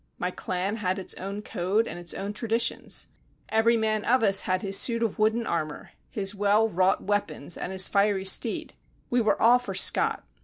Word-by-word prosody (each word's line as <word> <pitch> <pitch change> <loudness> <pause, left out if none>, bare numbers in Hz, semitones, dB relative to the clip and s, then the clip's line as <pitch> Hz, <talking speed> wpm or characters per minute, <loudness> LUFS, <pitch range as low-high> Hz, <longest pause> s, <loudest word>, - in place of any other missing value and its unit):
My 180 - -2
clan 185 +4 -3
had 185 -3 -1
its 190 - -4
own 200 +2 -6
code 195 +6 0
and 175 - -7
its 175 -1 -3
own 200 +1 -4
traditions. 230 +2 -2 0.4
Every 225 +2 +3
man 215 -1 0
of 255 0 +2
us 195 -2 +4
had 185 0 -1
his 195 -1 +2
suit 230 -1 +1
of 220 -2 -2
wooden 220 +2 +1
armour, 155 -5 -4 0.2
his 195 -1 -2
well 205 +2 +2
wrought 185 -2 +1
weapons 175 -6 -2
and - - -5
his 190 0 +2
fiery 200 -1 +1
steed. 190 - +2 0.4
We 245 0 +3
were 220 - +1
all 240 +2 +5
for 245 - -7
Scott. - - +2
205 Hz, 190 wpm, -26 LUFS, 190-225 Hz, 0.4 s, all